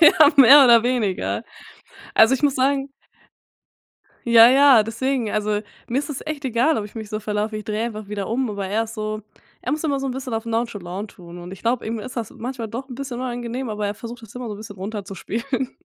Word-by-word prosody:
Ja, 310 -2 +7
mehr 275 +1 +9
oder 235 -2 +7
weniger. 195 - -1 0.7
Also, 225 +4 +6
ich 265 - -4
muss 285 -2 +3
sagen 275 +1 +1 1.4
Ja, 235 0 +8
ja, 270 -3 +7
deswegen, 230 +1 -2
also 210 0 0 0.3
mir 245 +3 0
ist 290 - -3
das 280 - -5
echt 300 -2 -5
egal, 255 +5 +2
ob 210 - -2
ich 210 - -12
mich 220 -2 -7
so 215 0 -4
verlaufe, 210 +1 -2
ich 215 - -6
drehe 215 +2 -2
einfach 215 -3 -6
wieder 205 -2 -4
um, 245 +1 -1
aber 200 -2 -4
er 215 +4 0
ist 225 +1 -9
so 215 -1 -4 0.4
er - - -3
muss 305 - -2
immer 285 -4 0
so 270 - -3
'n 255 - -2
bisschen 255 -3 -5
auf 225 +1 -3
nonchalant 210 -4 -3
tun, 175 -1 -12
und 175 +1 -9
ich 195 - -11
glaub, 235 +1 0
ihm 225 +1 -3
ist 250 +4 -8
das 230 -3 -3
manchmal 240 -1 -6
doch 255 +5 -6
'n 250 - -7
bisschen 265 -2 -6
unangenehm 245 0 -4
aber 210 -1 -3
er 205 - -3
versucht 230 +2 -9
das 225 - -13
immer 250 0 -6
so 210 - -5
'n - - -9
bisschen 205 -2 -10
runterzuspielen. 220 +6 -4
230 Hz, 225 wpm, -22 LUFS, 210-260 Hz, 1.4 s, mehr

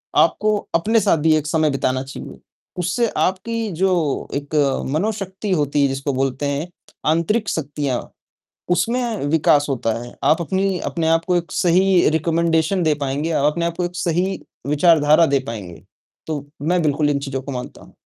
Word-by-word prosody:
आपको 215 0 +3 0.2
अपने 220 +7 +3
साथ 175 - +3
भी 155 +1 +3
एक 150 - -3
समय 155 0 +2
बिताना 130 -1 -1
चाहिए, 135 - -9 0.4
उससे 185 +7 +1
आपकी 220 +3 -1
जो 175 -4 0
एक 145 +2 -4 0.4
मनोशक्ति 195 +2 -2
होती 145 -3 +1
है 140 - +4
जिसको 135 +1 -2
बोलते 135 +1 -1
हैं 145 +5 -2 0.4
आंतरिक 200 +7 0
शक्तियाँ 145 -4 -2 0.7
उसमें 230 - 0
विकास 150 -2 +3
होता 120 -4 -1
है, 120 - -10
आप 165 +3 +3
अपनी 190 +3 0
अपने 165 -2 -1
आप 165 0 +2
को 180 -1 +2
एक 170 -1 -2
सही 185 +1 +3
रेकमेंडेशन 165 +2 +1
दे 155 -2 +3
पाएँगे। 140 +4 -1
आप 145 - +1
अपने 170 +1 -2
आप 170 0 -3
को 180 - 0
एक 175 0 -5
सही 180 +3 -1 0.3
विचारधारा 155 +1 +5
दे 140 -1 +2
पाएँगे, 100 -7 -7 0.4
तो 145 -3 -4 0.2
मैं 175 +3 +1
बिल्कुल 150 -1 +1
इन 140 - +1
चीज़ों 135 -1 -4
को 140 - -6
मानता 125 0 -7
हूँ। - - -18
160 Hz, 170 wpm, -20 LUFS, 145-180 Hz, 0.7 s, विचारधारा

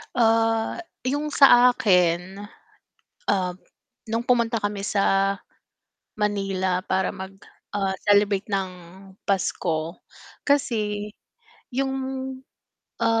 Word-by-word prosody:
Ah, 225 -1 +2 0.3
'yong 290 +2 -1
sa 250 -3 +7
akin, 180 -1 +1 0.8
ah, 185 -3 0 0.5
no'ng 230 +1 -1
pumunta 235 -2 +2
kami 205 -1 -3
sa 195 -1 +2 0.9
Manila 195 -3 0
para 190 0 -1
mag, 190 0 -7 0.4
ah, 195 -2 -1
celebrate 205 0 +2
ng 195 -1 0 0.5
Pasko. 170 -4 -1 0.5
Kasi 215 -7 0 0.7
'yong, 270 +1 -1 1.1
ah, 225 0 +3
205 Hz, 85 wpm, -24 LUFS, 190-230 Hz, 1.1 s, sa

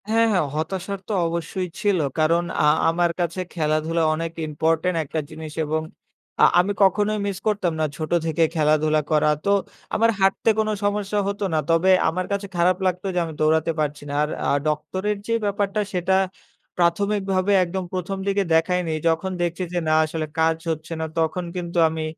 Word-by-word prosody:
হ্যাঁ, 225 +1 +4
হ্যাঁ। 180 -5 +2
হতাশার 190 +5 -3
তো 215 - -2
অবশ্যই 170 +2 -3
ছিল। 205 -4 +2 0.2
কারণ, 165 +2 +3 0.2
আ - - +3 0.2
আমার 170 +1 +1
কাছে 175 +1 -1
খেলাধুলা 160 +1 0
অনেক 165 +1 -3 0.2
ইম্পোর্টেন্ট 160 +3 0
একটা 155 +2 -3
জিনিস 155 0 -8
এবং 155 +1 -1 0.6
আ - - +10
আমি 185 +3 +2
কখনোই 210 +2 +2
মিস 195 -2 -3
করতাম 200 -5 +1
না। 155 - +2
ছোট 155 -1 -5
থেকে 165 0 +1
খেলাধুলা 155 0 +2
করা, 150 0 +3 0.2
তো 200 - +3 0.4
আমার 230 +1 +3
হাঁটতে 195 +3 +2
কোনো 215 0 +1
সমস্যা 205 0 0
হত 200 0 -3
না। 155 - +2
তবে 165 +3 +3 0.2
আমার 185 +3 -2
কাছে 200 0 -2
খারাপ 175 +1 +3
লাগত 180 -1 0
যে - - +2
আমি 160 - -7
দৌড়াতে 160 +1 +2
পারছি 150 -1 -2
না। - - -4
আর 150 - -1 0.2
আ - - +3 0.2
ডক্টরের 185 +7 -1
যে 230 - 0
ব্যাপারটা, 200 0 -1
সেটা 185 +1 +1 0.6
প্রাথমিকভাবে 195 +2 +1
একদম 185 +2 -3
১ম 185 +1 -3
দিকে 200 0 +2
দেখায়নি। 170 0 +1 0.2
যখন 165 +4 -1
দেখছি 175 +1 -1
যে 175 - +1
না, 155 - +3
আসলে 155 0 -3
কাজ 160 0 +3
হচ্ছে 160 +1 -5
না, - - -1
তখন 165 +3 0
কিন্তু 175 -1 -4
আমি, 160 0 -4
175 Hz, 175 wpm, -23 LUFS, 160-195 Hz, 0.6 s, আ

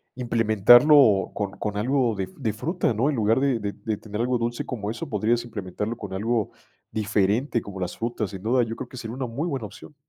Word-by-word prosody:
implementarlo 120 0 +5
con 100 -2 -3
con 105 -1 -3
algo 125 +1 +1
de 95 -1 -3
de 110 -7 -2
fruta, 160 - -1
¿no? 125 +8 +1
En 145 - 0
lugar 110 +2 +2
de 135 -4 +1
de 100 -1 -3
de 110 -2 -4
tener 105 +1 -5
algo 125 0 +1
dulce 120 +1 -2
como 110 -4 -4
eso, 140 +6 -6
podrías 120 +1 +1
implementarlo 105 +1 -4
con 100 -3 -7
algo 110 +2 -1 0.4
diferente 110 +4 +1
como 100 -2 -8
las 90 -1 -4
frutas, 115 -3 -2
sin 95 0 -8
duda, 125 +3 +3
yo 115 0 -4
creo 130 - -7
que 130 - -11
sería 115 0 -6
una 130 -1 -3
muy 140 +9 -3
buena 135 -8 -3
opción. 105 +8 -12
115 Hz, 215 wpm, -25 LUFS, 105-125 Hz, 0.4 s, implementarlo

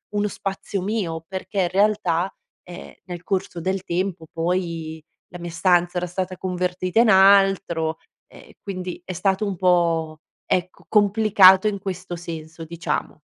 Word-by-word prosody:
uno 205 0 +1
spazio 195 -1 -4
mio, 180 -6 -3
perché 190 +1 -3
in 175 - +1
realtà, 190 -2 +1 0.3
ehm, 175 - -10
nel 175 -1 -8
corso 185 -3 -3
del 190 +1 -2
tempo 180 -1 -3
poi 165 -2 -3 0.3
la 175 - -10
mia 170 -1 -6
stanza 175 +1 +2
era 180 0 -1
stata 185 +1 -4
convertita 180 +2 -1
in 235 -2 +5
altro 190 -4 +4 0.3
e - - -17
quindi 185 -3 -6
è 185 - -5
stato 190 +3 0
un 195 -2 -2
po', 165 -3 +1 0.3
ecco, 180 0 -2
complicato 205 -2 +5
in 200 -2 -4
questo 185 -2 -5
senso, 165 -1 -8
diciamo. 170 -2 -4
180 Hz, 145 wpm, -22 LUFS, 170-195 Hz, 0.3 s, in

